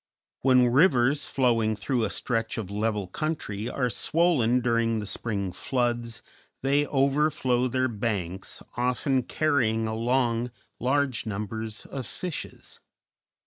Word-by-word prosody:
When 125 Hz, -2 st, +5 dB
rivers 135 Hz, 0 st, +3 dB
flowing 115 Hz, -4 st, +2 dB
through 115 Hz, +3 st, -1 dB
a -, -, -2 dB
stretch 115 Hz, +1 st, -1 dB
of 100 Hz, -4 st, -4 dB
level 105 Hz, -1 st, -1 dB
country 115 Hz, -, -3 dB
are 125 Hz, 0 st, 0 dB
swollen 125 Hz, -, +2 dB
during 115 Hz, -1 st, +1 dB
the 105 Hz, -, -3 dB
spring 100 Hz, -1 st, -2 dB
floods, 120 Hz, +2 st, -1 dB, 0.4 s
they 140 Hz, +2 st, +2 dB
overflow 135 Hz, -2 st, +2 dB
their 130 Hz, +1 st, +1 dB
banks, 100 Hz, -5 st, -3 dB
often 125 Hz, +2 st, +1 dB
carrying 120 Hz, -6 st, +1 dB
along 120 Hz, +1 st, +1 dB, 0.3 s
large 130 Hz, -2 st, 0 dB
numbers 110 Hz, +1 st, -4 dB
of 130 Hz, -4 st, -6 dB
fishes. 180 Hz, -4 st, -6 dB
120 Hz, 115 wpm, -27 LUFS, 110-135 Hz, 0.4 s, When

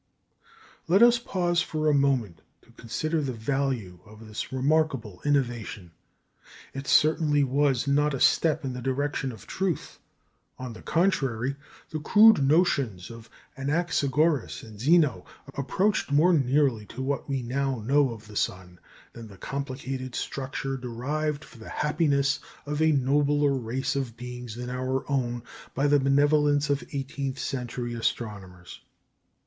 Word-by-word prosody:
Let 195 Hz, +6 st, +5 dB
us 240 Hz, 0 st, +6 dB
pause 175 Hz, -6 st, 0 dB
for 155 Hz, -1 st, -2 dB
a 150 Hz, -, +4 dB
moment 130 Hz, -, +1 dB, 0.2 s
to -, -, -22 dB
consider 155 Hz, +8 st, -2 dB
the 135 Hz, -3 st, -2 dB
value 120 Hz, -6 st, -2 dB
of 110 Hz, +1 st, -14 dB
this 105 Hz, -, -5 dB
remarkable 130 Hz, -, 0 dB
innovation. 120 Hz, -, -1 dB, 0.8 s
It 135 Hz, 0 st, -6 dB
certainly 150 Hz, -2 st, +4 dB
was 140 Hz, 0 st, +1 dB
not 145 Hz, +1 st, +2 dB
a -, -, -4 dB
step 155 Hz, +1 st, +3 dB
in 130 Hz, -, -3 dB
the 125 Hz, -, -6 dB
direction 135 Hz, +1 st, -1 dB
of 110 Hz, -, -12 dB
truth. 190 Hz, -4 st, -3 dB, 0.6 s
On 130 Hz, -2 st, -6 dB
the -, -, -12 dB
contrary, 135 Hz, -8 st, 0 dB, 0.4 s
the 155 Hz, -, -3 dB
crude 215 Hz, +2 st, +6 dB
notions 135 Hz, -, +1 dB
of 115 Hz, 0 st, -12 dB, 0.3 s
Anaxagoras 145 Hz, -1 st, 0 dB
and 110 Hz, -3 st, -12 dB
Xeno 145 Hz, -, +3 dB, 0.3 s
approached 185 Hz, +6 st, 0 dB
more 160 Hz, +6 st, +5 dB
nearly 135 Hz, -6 st, +2 dB
to 130 Hz, +3 st, -6 dB
what 140 Hz, +2 st, -2 dB
we 135 Hz, -2 st, -1 dB
now 135 Hz, +1 st, -1 dB
know 135 Hz, +4 st, +3 dB
of 115 Hz, -2 st, -9 dB
the 105 Hz, -1 st, -13 dB
sun, 90 Hz, -3 st, -3 dB, 0.3 s
than 115 Hz, -1 st, -9 dB
the 100 Hz, -2 st, -14 dB
complicated 130 Hz, 0 st, -5 dB
structure 135 Hz, 0 st, -3 dB
devised 145 Hz, +5 st, -3 dB
for 120 Hz, -, -16 dB
the 110 Hz, -, -10 dB
happiness 145 Hz, -2 st, +1 dB, 0.3 s
of 150 Hz, +1 st, -2 dB
a 160 Hz, 0 st, +4 dB
nobler 145 Hz, +1 st, +2 dB
race 130 Hz, +3 st, -2 dB
of 125 Hz, -4 st, -3 dB
beings 125 Hz, -2 st, -7 dB
than 125 Hz, +1 st, -5 dB
our 130 Hz, +1 st, -2 dB
own 120 Hz, -3 st, -1 dB, 0.3 s
by 135 Hz, -, +1 dB
the 145 Hz, 0 st, +4 dB
benevolence 145 Hz, +1 st, +3 dB
of 140 Hz, -, 0 dB
eighteenth 135 Hz, -1 st, -4 dB
century 125 Hz, -2 st, -4 dB
astronomers. 100 Hz, -6 st, -4 dB
135 Hz, 145 wpm, -27 LUFS, 120-145 Hz, 0.8 s, us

